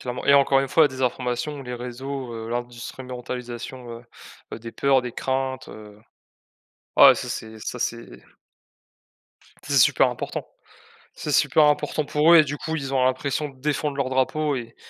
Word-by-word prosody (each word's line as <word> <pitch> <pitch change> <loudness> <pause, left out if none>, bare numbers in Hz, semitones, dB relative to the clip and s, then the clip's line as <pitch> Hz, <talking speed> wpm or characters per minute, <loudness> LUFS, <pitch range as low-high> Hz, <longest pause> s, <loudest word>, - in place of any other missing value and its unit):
clairement, 125 0 -5
et 140 - +6
encore 140 -1 +5
une 135 - -2
fois 160 - +4
la - - +4
désinformation, 130 +2 -2
les 125 -1 -6
réseaux, 125 +1 -6
heu, 115 0 -6
l'instrumentalisation 125 0 -7
heu - - -21 0.5
heu, - - -5
des 115 0 -9
peurs, 135 -1 +3
des 125 -1 -6
craintes, 130 0 -3
heu 105 -1 -12 1.0
ouais, - - +9
ça - - -5
c'est 110 0 -6
ça 125 +3 -6
c'est 115 0 -5 1.4
c'est - - -2
super - - +5
important, - - -5 0.7
c'est - - -5
super 155 - +4
important 150 +1 +1
pour 150 +4 +4
eux - - +10
et 155 - +7
du 145 0 -5
coup 160 +2 -4
ils 135 -3 -4
ont 130 -1 +2
l'impression 140 +3 -1
de 135 -2 -18
défendre 145 0 -1
leur 135 -2 -1
drapeau 130 +3 0
et 115 -3 -7
130 Hz, 170 wpm, -24 LUFS, 120-140 Hz, 1.4 s, eux